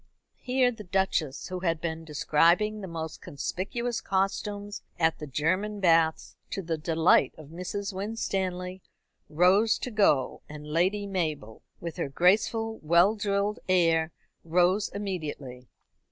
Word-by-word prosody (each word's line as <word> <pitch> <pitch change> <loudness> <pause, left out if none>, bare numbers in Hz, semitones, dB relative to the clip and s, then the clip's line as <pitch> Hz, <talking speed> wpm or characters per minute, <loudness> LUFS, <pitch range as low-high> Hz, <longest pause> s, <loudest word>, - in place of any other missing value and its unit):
Here 255 0 +2
the 220 -3 -9
Duchess, 180 -7 -1
who 185 0 -4
had 165 -3 0
been 165 -1 -4
describing 170 +7 +2
the 190 - -6
most 160 -2 -6
conspicuous 230 - -3
costumes 205 +1 -2 0.2
at 165 -1 +1
the 150 - -6
German 185 +9 -1
baths, 165 -3 +2
to 195 - -4
the 165 -1 -1
delight 160 +2 +3
of 155 -2 -12
Mrs. 185 +4 -5
Winstanley, 190 -3 -3 0.5
rose 190 +8 +4
to 250 - -5
go, 195 - +2
and 150 0 -9
Lady 180 +7 +1
Mabel, 155 - -3 0.2
with 170 -2 -6
her - - -2
graceful, 220 +8 +2
well 170 +6 +4
drilled 205 0 -1
air, 165 -3 +3 0.3
rose 180 +5 +2
immediately. 150 -11 -5
180 Hz, 130 wpm, -28 LUFS, 160-205 Hz, 0.5 s, rose